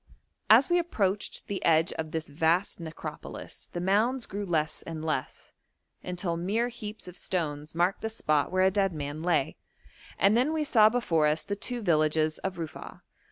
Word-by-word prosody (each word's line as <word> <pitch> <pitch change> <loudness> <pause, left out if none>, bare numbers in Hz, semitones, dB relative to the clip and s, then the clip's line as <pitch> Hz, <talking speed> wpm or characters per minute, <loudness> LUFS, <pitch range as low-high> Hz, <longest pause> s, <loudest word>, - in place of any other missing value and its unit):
As 235 +5 +7
we 350 0 +3
approached 210 - -1
the 200 - -4
edge 165 0 +3
of 160 -1 -4
this 160 0 -3
vast 165 +7 +1
necropolis 160 -2 -7
the 175 - -4
mounds 220 +8 +1
grew 200 +1 -5
less 155 -3 0
and 160 -1 -6
less, 155 -5 -3 0.5
until 180 -1 -3
mere 210 +8 0
heaps 215 -4 -8
of 180 - -9
stones 155 -5 -3
marked 175 +3 +1
the 220 - -2
spot 155 -9 0
where 185 0 +3
a 190 - +4
dead 195 -2 +1
man 145 0 -5
lay, 165 -5 +1 0.6
and 200 +3 +4
then 260 +6 +2
we 315 -1 0
saw 220 -7 +6
before 170 -10 +2
us 150 +1 +1
the 200 - -3
two 240 +3 -4
villages 155 -2 +2
of 190 -1 -3
Rufa'a. 165 -3 -8
180 Hz, 175 wpm, -28 LUFS, 160-210 Hz, 0.6 s, As